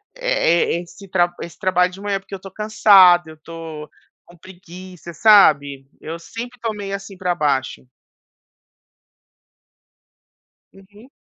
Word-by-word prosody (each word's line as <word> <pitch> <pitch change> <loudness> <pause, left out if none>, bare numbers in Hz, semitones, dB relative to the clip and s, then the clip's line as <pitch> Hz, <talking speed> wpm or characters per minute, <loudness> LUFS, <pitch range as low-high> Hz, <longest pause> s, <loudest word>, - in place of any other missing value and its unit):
eh, - - +1
e - - -6
esse 195 +3 -15
tra 175 -2 0
esse 170 - -9
trabalho 180 -1 +1
de 195 +2 -12
manhã, 200 -1 -2
porque 195 0 -10
eu 190 - -10
tô 195 -1 -11
cansado, 190 -5 +4
eu 160 - -12
estou 160 -1 -10 0.4
com 175 - -19
preguiça, 180 -1 -13
sabe. 145 -10 +4
Eu 165 +2 -7
sempre 240 +8 -9
tô 225 -1 -2
meio 200 -1 -5
assim 195 -1 -10
pra 180 -2 -1
baixo. 140 -6 -2 2.9
Uhum. 205 +6 -19
185 Hz, 135 wpm, -19 LUFS, 165-200 Hz, 2.9 s, cansado